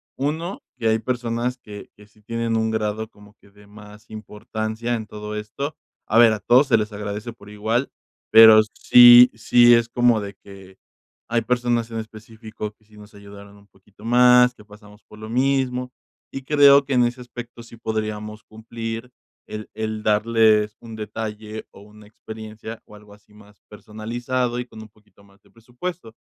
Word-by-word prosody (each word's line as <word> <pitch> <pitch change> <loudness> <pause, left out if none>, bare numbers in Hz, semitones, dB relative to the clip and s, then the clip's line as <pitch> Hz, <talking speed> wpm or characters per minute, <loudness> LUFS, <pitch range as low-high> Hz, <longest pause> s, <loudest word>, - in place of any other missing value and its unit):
1, 160 +7 -4 0.2
que 115 -2 -2
hay 110 0 +2
personas 120 0 -3
que 105 -4 -12
que 105 - -17
sí 105 +1 -27
tienen 115 +1 -3
un 110 0 0
grado 110 0 -3
como 105 -1 -19
que 100 - -22
de 105 +1 -21
más 105 0 -16
importancia 110 +2 -5
en 110 -2 -6
todo 105 0 -8
esto. 110 +8 -6 0.3
A 110 - +1
ver, 115 -2 +6
a 105 - -4
todos 125 +7 +3
se - - +3
les 105 0 -4
agradece 105 +3 -6
por 105 -3 -17
igual, 110 +5 -2 0.4
pero 110 -1 +9
sí 120 0 +8
sí 120 +2 +4
es 115 0 +2
como 120 -2 +2
de 100 -1 -8
que 95 -1 -15 0.5
hay 115 0 +1
personas 120 -1 -1
en 115 - -6
específico 110 -1 -9
que 110 - -35
sí 105 0 -22
nos 105 0 -16
ayudaron 100 0 -14
un 100 - -21
poquito 100 +3 -20
más, 125 +1 +5
que 105 - -18
pasamos 105 0 -17
por 105 - -17
lo 110 0 -10
mismo, 125 0 -1 0.4
y 135 - -7
creo 140 0 +5
que 140 - -3
en 125 -1 +3
ese 120 +1 -4
aspecto 120 -1 -10
sí 115 - -15
podríamos 110 -1 -5
cumplir 115 +1 -8 0.4
el 110 0 -8
el 110 0 -5
darles 110 0 +2
un 115 -1 -11
detalle 110 0 -7
o - - -16
una 105 +1 -17
experiencia 110 +1 -10
o 105 - -16
algo 105 0 -17
así 105 0 -27
más 105 -1 -20
personalizado 120 +4 -4
y 125 - -4
con 110 - -14
un 110 - -13
poquito 105 -1 -27
más 100 0 -25
de - - -27
presupuesto. 120 +4 -9
110 Hz, 180 wpm, -21 LUFS, 105-120 Hz, 0.5 s, pero